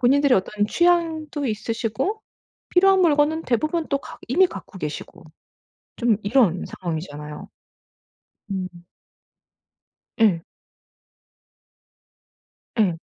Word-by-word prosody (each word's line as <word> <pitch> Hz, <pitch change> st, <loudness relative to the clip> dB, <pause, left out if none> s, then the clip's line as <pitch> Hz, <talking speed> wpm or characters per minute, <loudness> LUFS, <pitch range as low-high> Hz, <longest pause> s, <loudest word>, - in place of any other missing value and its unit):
본인들의 275 Hz, +2 st, +4 dB
어떤 205 Hz, +2 st, 0 dB
취향도 325 Hz, -2 st, +1 dB
있으시고 230 Hz, -, -2 dB, 0.5 s
필요한 385 Hz, +1 st, +5 dB
물건은 310 Hz, 0 st, +3 dB
대부분 310 Hz, +7 st, 0 dB
또 280 Hz, -, +1 dB
갖 -, -, -11 dB
이미 365 Hz, +9 st, +5 dB
갖고 195 Hz, -, -10 dB
계시고 155 Hz, +1 st, -6 dB, 0.7 s
좀 235 Hz, -3 st, +3 dB
이런 205 Hz, -5 st, +3 dB
상황이잖아요. 155 Hz, -4 st, -6 dB, 1.0 s
음. 185 Hz, -2 st, -5 dB, 1.4 s
예. 190 Hz, -7 st, +4 dB, 2.4 s
예. 185 Hz, -6 st, +3 dB
240 Hz, 195 characters per minute, -23 LUFS, 185-315 Hz, 2.4 s, 필요한